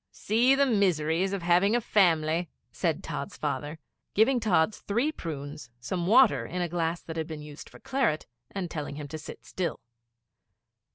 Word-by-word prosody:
'See 240 Hz, +6 st, +3 dB
the 280 Hz, +1 st, +4 dB
miseries 185 Hz, -, +2 dB
of 200 Hz, -3 st, -3 dB
having 180 Hz, +5 st, +4 dB
a -, -, +3 dB
family!' 170 Hz, -6 st, +2 dB, 0.2 s
said -, -, -1 dB
Tods' -, -, -5 dB
father, 150 Hz, +2 st, -3 dB, 0.4 s
giving 245 Hz, +5 st, +4 dB
Tods 205 Hz, -4 st, +2 dB
three 235 Hz, +9 st, 0 dB
prunes, 145 Hz, -, -7 dB
some 170 Hz, +8 st, -3 dB
water 235 Hz, +3 st, +5 dB
in 180 Hz, -, -5 dB
a -, -, -1 dB
glass 170 Hz, 0 st, -2 dB
that 165 Hz, 0 st, -7 dB
had 160 Hz, -1 st, -2 dB
been 155 Hz, -2 st, -7 dB
used 150 Hz, 0 st, -10 dB
for -, -, -15 dB
claret, 260 Hz, -, 0 dB, 0.2 s
and 185 Hz, -4 st, -4 dB
telling 145 Hz, -2 st, -4 dB
him 145 Hz, 0 st, -6 dB
to 155 Hz, +2 st, -6 dB
sit 150 Hz, -, -10 dB
still. 180 Hz, -2 st, -3 dB
175 Hz, 170 wpm, -28 LUFS, 155-210 Hz, 0.4 s, water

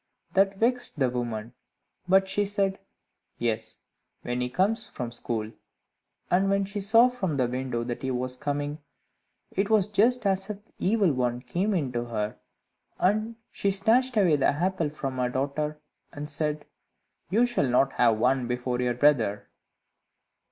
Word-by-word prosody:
That 195 Hz, 0 st, +3 dB
vexed 245 Hz, -2 st, 0 dB
the 130 Hz, -3 st, +2 dB
woman, 120 Hz, -2 st, -4 dB, 0.5 s
but 190 Hz, +1 st, +4 dB
she 195 Hz, +2 st, +1 dB
said, 195 Hz, -1 st, 0 dB, 0.6 s
"Yes, 115 Hz, -2 st, -2 dB, 0.5 s
when 125 Hz, +1 st, -2 dB
he 125 Hz, -, -1 dB
comes 195 Hz, -, +1 dB
from 120 Hz, -2 st, -5 dB
school." 115 Hz, -2 st, -3 dB, 0.8 s
And 190 Hz, +2 st, +3 dB
when 195 Hz, 0 st, +2 dB
she 200 Hz, +1 st, -4 dB
saw 225 Hz, +5 st, +6 dB
from 190 Hz, -, -2 dB
the 130 Hz, -2 st, +2 dB
window 125 Hz, -1 st, -2 dB
that 120 Hz, 0 st, -4 dB
he 130 Hz, -, -2 dB
was 125 Hz, 0 st, -2 dB
coming, 145 Hz, +2 st, -3 dB, 0.7 s
it 195 Hz, +2 st, -1 dB
was 215 Hz, -4 st, +4 dB
just 220 Hz, +4 st, +2 dB
as 195 Hz, 0 st, +1 dB
if 210 Hz, 0 st, -7 dB
the -, -, -30 dB
Evil 195 Hz, -5 st, +2 dB
One 125 Hz, -2 st, 0 dB
came 190 Hz, +10 st, -1 dB
into 125 Hz, -7 st, -1 dB
her, 110 Hz, -3 st, -3 dB, 0.6 s
and 215 Hz, +5 st, +1 dB, 0.2 s
she 200 Hz, -, 0 dB
snatched 225 Hz, +6 st, +2 dB
away 175 Hz, -7 st, +4 dB
the 135 Hz, -, +3 dB
apple 170 Hz, +1 st, 0 dB
from 135 Hz, -3 st, -5 dB
her 125 Hz, -1 st, +1 dB
daughter, 145 Hz, +4 st, -2 dB, 0.3 s
and 145 Hz, +1 st, -6 dB
said, 150 Hz, 0 st, -1 dB, 0.6 s
"You 225 Hz, +7 st, +4 dB
shall 240 Hz, -, 0 dB
not 135 Hz, +2 st, +3 dB
have 115 Hz, -3 st, +3 dB
one 125 Hz, +2 st, +2 dB
before 125 Hz, 0 st, -2 dB
your 125 Hz, -1 st, 0 dB
brother." 115 Hz, -7 st, +2 dB
150 Hz, 160 wpm, -27 LUFS, 125-195 Hz, 0.8 s, saw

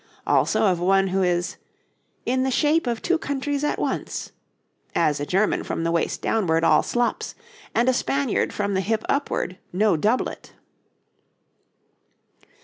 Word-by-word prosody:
Also -, -, +2 dB
of 185 Hz, -4 st, +2 dB
one 195 Hz, +2 st, +3 dB
who 190 Hz, +1 st, 0 dB
is 175 Hz, -1 st, 0 dB, 0.7 s
'in 260 Hz, +1 st, +1 dB
the 265 Hz, -, +1 dB
shape 300 Hz, +3 st, +2 dB
of 235 Hz, -2 st, -2 dB
two 350 Hz, -2 st, +2 dB
countries 285 Hz, 0 st, -2 dB
at 295 Hz, -, 0 dB
once, -, -, -3 dB, 0.6 s
as 150 Hz, -3 st, +2 dB
a 145 Hz, -, -3 dB
German 195 Hz, +3 st, +1 dB
from 165 Hz, -, -3 dB
the 165 Hz, -, 0 dB
waist 170 Hz, -1 st, -1 dB
downwards 165 Hz, -7 st, +1 dB
all -, -, +5 dB
slops, 240 Hz, 0 st, -1 dB, 0.4 s
and 240 Hz, -, +3 dB
a 260 Hz, -, +4 dB
Spaniard 275 Hz, 0 st, 0 dB
from 200 Hz, -1 st, -2 dB
the 190 Hz, -, +1 dB
hip 220 Hz, +2 st, -1 dB
upward, 280 Hz, -9 st, -1 dB
no 205 Hz, +1 st, +2 dB
doublet.' 215 Hz, +10 st, -1 dB
210 Hz, 145 wpm, -24 LUFS, 180-260 Hz, 0.7 s, all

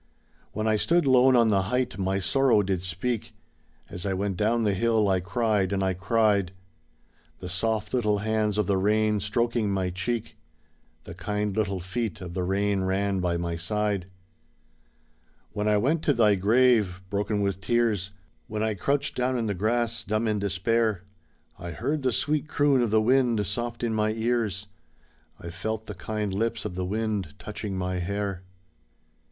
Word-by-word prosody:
When 110 Hz, +1 st, -2 dB
I 110 Hz, -1 st, +3 dB
stood 170 Hz, +8 st, +2 dB
lone 130 Hz, 0 st, +5 dB
on 115 Hz, -2 st, +5 dB
the 100 Hz, -2 st, +3 dB
height 125 Hz, +3 st, -1 dB
my 95 Hz, 0 st, 0 dB
sorrow 120 Hz, +2 st, +3 dB
did 95 Hz, -2 st, -1 dB
speak, 105 Hz, +5 st, -3 dB, 0.5 s
As 90 Hz, -, -7 dB
I 100 Hz, -, -1 dB
went 100 Hz, 0 st, -1 dB
down 115 Hz, +4 st, +1 dB
the 105 Hz, -2 st, +2 dB
hill, 110 Hz, +1 st, +2 dB
I 95 Hz, -1 st, +2 dB
cried 100 Hz, +1 st, 0 dB
and 95 Hz, -1 st, 0 dB
I 95 Hz, 0 st, +1 dB
cried. 100 Hz, -1 st, +1 dB, 0.8 s
The -, -, -8 dB
soft 105 Hz, +4 st, -1 dB
little 105 Hz, -5 st, +2 dB
hands 105 Hz, 0 st, 0 dB
of 105 Hz, -, +2 dB
the 95 Hz, +1 st, +1 dB
rain 105 Hz, +2 st, +2 dB
stroking 115 Hz, +2 st, 0 dB
my 95 Hz, -2 st, -1 dB
cheek, 110 Hz, +4 st, -3 dB, 0.7 s
The -, -, -9 dB
kind 105 Hz, +3 st, -2 dB
little 100 Hz, -3 st, 0 dB
feet 105 Hz, +4 st, -3 dB
of 90 Hz, -2 st, -7 dB
the 90 Hz, -, -2 dB
rain 100 Hz, +2 st, 0 dB
ran 95 Hz, +1 st, 0 dB
by 90 Hz, -1 st, 0 dB
my 85 Hz, 0 st, -2 dB
side. 100 Hz, +2 st, -1 dB, 1.4 s
When 105 Hz, 0 st, -2 dB
I 105 Hz, 0 st, +4 dB
went 145 Hz, +10 st, +1 dB
to 145 Hz, -, +3 dB
thy 110 Hz, -3 st, +5 dB
grave, 105 Hz, -2 st, +3 dB
broken 105 Hz, +1 st, -1 dB
with 100 Hz, -2 st, -1 dB
tears, 110 Hz, -2 st, +1 dB, 0.4 s
When 105 Hz, 0 st, -3 dB
I 110 Hz, -1 st, +1 dB
crouched 140 Hz, +8 st, -1 dB
down 125 Hz, 0 st, 0 dB
in 115 Hz, -, -1 dB
the 105 Hz, -, -1 dB
grass, 115 Hz, +3 st, 0 dB
dumb 110 Hz, +2 st, -1 dB
in 105 Hz, -1 st, 0 dB
despair, 100 Hz, +1 st, 0 dB, 0.6 s
I 90 Hz, -2 st, -6 dB
heard 140 Hz, -, -2 dB
the 130 Hz, -1 st, +1 dB
sweet 150 Hz, +4 st, 0 dB
croon 145 Hz, -4 st, +3 dB
of 120 Hz, -, +1 dB
the 110 Hz, +1 st, +3 dB
wind 120 Hz, -3 st, +3 dB
soft 120 Hz, +4 st, -4 dB
in 115 Hz, -2 st, 0 dB
my 110 Hz, 0 st, +1 dB
ears, 110 Hz, -4 st, -1 dB, 0.7 s
I 85 Hz, -, -7 dB
felt 110 Hz, +5 st, -4 dB
the 105 Hz, -, -6 dB
kind 105 Hz, +2 st, -3 dB
lips 115 Hz, +1 st, -1 dB
of -, -, -3 dB
the 90 Hz, 0 st, -3 dB
wind 105 Hz, -2 st, -2 dB
touching 105 Hz, -1 st, -5 dB
my 90 Hz, 0 st, -2 dB
hair. 100 Hz, 0 st, -3 dB
105 Hz, 175 wpm, -26 LUFS, 95-115 Hz, 1.4 s, lone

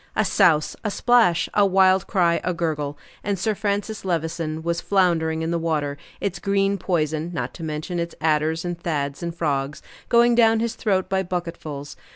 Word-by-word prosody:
A -, -, +2 dB
souse, 155 Hz, -3 st, +3 dB
a 215 Hz, -, 0 dB
splash, 230 Hz, -6 st, +3 dB
a 205 Hz, -, +4 dB
wild 190 Hz, -1 st, +4 dB
cry, 175 Hz, -4 st, +2 dB
a 180 Hz, -, -1 dB
gurgle, 150 Hz, -4 st, -2 dB, 0.3 s
and 200 Hz, -1 st, -1 dB
Sir 215 Hz, +4 st, 0 dB
Francis 205 Hz, +1 st, -2 dB
Levison 160 Hz, -3 st, -2 dB
was 170 Hz, 0 st, -1 dB
floundering 165 Hz, -5 st, +1 dB
in 165 Hz, -, -2 dB
the 170 Hz, -, 0 dB
water, 150 Hz, -3 st, -1 dB, 0.2 s
its 190 Hz, -3 st, -3 dB
green 200 Hz, 0 st, +1 dB
poison, 160 Hz, -3 st, -1 dB
not -, -, -3 dB
to 165 Hz, -, -9 dB
mention 155 Hz, +3 st, -3 dB
its 170 Hz, 0 st, -4 dB
adders 160 Hz, +1 st, +1 dB
and 175 Hz, -1 st, -5 dB
toads 140 Hz, -4 st, -2 dB
and 170 Hz, -1 st, -4 dB
frogs, 145 Hz, -3 st, -2 dB, 0.3 s
going 235 Hz, 0 st, +5 dB
down 225 Hz, -1 st, +4 dB
his 230 Hz, 0 st, -1 dB
throat 190 Hz, -4 st, 0 dB
by 190 Hz, 0 st, 0 dB
bucketfuls. 170 Hz, -5 st, -5 dB
170 Hz, 180 wpm, -23 LUFS, 160-195 Hz, 0.3 s, going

